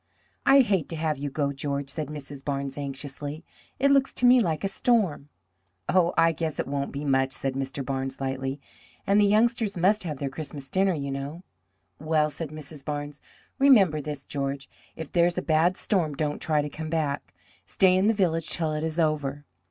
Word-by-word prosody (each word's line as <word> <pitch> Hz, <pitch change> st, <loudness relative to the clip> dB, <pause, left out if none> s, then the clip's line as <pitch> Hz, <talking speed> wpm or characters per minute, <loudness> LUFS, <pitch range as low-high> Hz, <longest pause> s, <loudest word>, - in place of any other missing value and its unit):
"I 275 Hz, 0 st, +8 dB
hate 195 Hz, -, 0 dB
to 165 Hz, -, -4 dB
have 155 Hz, -3 st, -1 dB
you 145 Hz, 0 st, -3 dB
go, 140 Hz, 0 st, -1 dB
George," 140 Hz, 0 st, -3 dB
said 155 Hz, -1 st, -3 dB
Mrs. 140 Hz, -2 st, -8 dB
Barnes 140 Hz, -1 st, -3 dB
anxiously. 145 Hz, +2 st, -6 dB, 0.3 s
"It 280 Hz, +1 st, +3 dB
looks 275 Hz, -1 st, +3 dB
to 250 Hz, -, +1 dB
me 250 Hz, +1 st, +7 dB
like 165 Hz, -7 st, 0 dB
a -, -, +2 dB
storm." 195 Hz, -, +1 dB, 0.6 s
"Oh, 180 Hz, -2 st, +3 dB
I 165 Hz, -, +5 dB
guess 160 Hz, -1 st, -3 dB
it -, -, 0 dB
won't 140 Hz, 0 st, -3 dB
be 140 Hz, +1 st, -5 dB
much," 135 Hz, -1 st, +2 dB
said 135 Hz, 0 st, -2 dB
Mr. 135 Hz, 0 st, -4 dB
Barnes 135 Hz, 0 st, -3 dB
lightly; 135 Hz, +1 st, -3 dB, 0.5 s
"and 200 Hz, +1 st, +4 dB
the -, -, +5 dB
youngsters 220 Hz, -1 st, +2 dB
must 200 Hz, +5 st, +3 dB
have 155 Hz, -5 st, -4 dB
their 140 Hz, -, -3 dB
Christmas 140 Hz, -1 st, -7 dB
dinner, 190 Hz, -1 st, +2 dB
you 140 Hz, -2 st, -4 dB
know." 140 Hz, +6 st, -5 dB, 0.6 s
"Well," 155 Hz, -1 st, +1 dB
said 155 Hz, +2 st, -5 dB
Mrs. 155 Hz, -1 st, -10 dB
Barnes, 145 Hz, 0 st, -5 dB, 0.4 s
"remember 200 Hz, -, +5 dB
this, 145 Hz, -1 st, -6 dB
George: 140 Hz, -1 st, -3 dB, 0.3 s
if 160 Hz, -3 st, -7 dB
there 170 Hz, -1 st, +4 dB
is 175 Hz, -, -2 dB
a -, -, -1 dB
bad 165 Hz, +3 st, +2 dB
storm 165 Hz, -8 st, 0 dB
don't 150 Hz, 0 st, -2 dB
try 150 Hz, -2 st, +1 dB
to -, -, -3 dB
come 155 Hz, +2 st, -6 dB
back. 155 Hz, -3 st, -2 dB, 0.3 s
Stay 185 Hz, -1 st, +4 dB
in 190 Hz, +2 st, +3 dB
the 225 Hz, -, +3 dB
village 165 Hz, -5 st, 0 dB
till 160 Hz, -2 st, -1 dB
it 150 Hz, 0 st, -2 dB
is 160 Hz, 0 st, -3 dB
over. 145 Hz, -3 st, 0 dB
150 Hz, 200 wpm, -26 LUFS, 140-175 Hz, 0.6 s, I